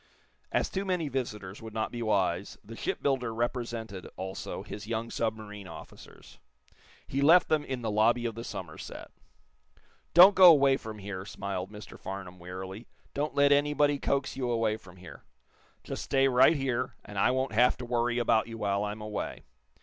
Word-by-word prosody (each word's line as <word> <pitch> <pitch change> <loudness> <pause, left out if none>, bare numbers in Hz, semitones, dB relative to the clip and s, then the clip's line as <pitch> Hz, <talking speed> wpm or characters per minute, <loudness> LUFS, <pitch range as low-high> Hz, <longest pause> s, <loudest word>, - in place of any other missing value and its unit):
As - - +1
too 195 - -3
many 180 -6 -1
visitors 105 -7 -4
would 110 -1 -9
not 110 - -1
be 120 - -5
wise 95 -4 0
the 115 +2 -10
shipbuilder 130 -1 -1
represented, 115 -4 -3
also, 95 +1 -5
his 105 0 -8
young 115 0 -3
submarine 110 -3 -4
officers. - - -13 0.7
He 135 - -2
left 165 +5 +6
them 155 -2 +2
in 130 -3 -5
the 110 - -1
lobby 115 +3 +3
of 115 - -1
the 115 +2 -7
Somerset. 90 -8 -8 1.0
"Don't 185 +4 +10
go 185 -2 +9
away 140 -3 +5
from 110 -4 -7
here," 100 -2 -6
smiled 95 -1 -5
Mr. 105 0 -11
Farnum, 95 -2 -7
wearily. 95 +5 -8 0.3
"Don't 150 +2 -2
let 140 0 +5
anybody 145 0 +3
coax 140 -1 -1
you 130 -2 -2
away 115 -2 +1
from 95 -5 -14
here. 90 0 -12 0.6
Just - - -5
stay 135 0 +3
right 130 +5 +5
here, 130 -3 -2
and 100 -1 -6
I - - +4
won't 130 -1 0
have 125 +3 +4
to 125 - -7
worry 120 0 0
about 115 -2 +2
you 115 -1 -7
while 100 -2 0
I'm 105 +1 -4
away. 105 -1 -5
115 Hz, 170 wpm, -29 LUFS, 105-135 Hz, 1.0 s, Don't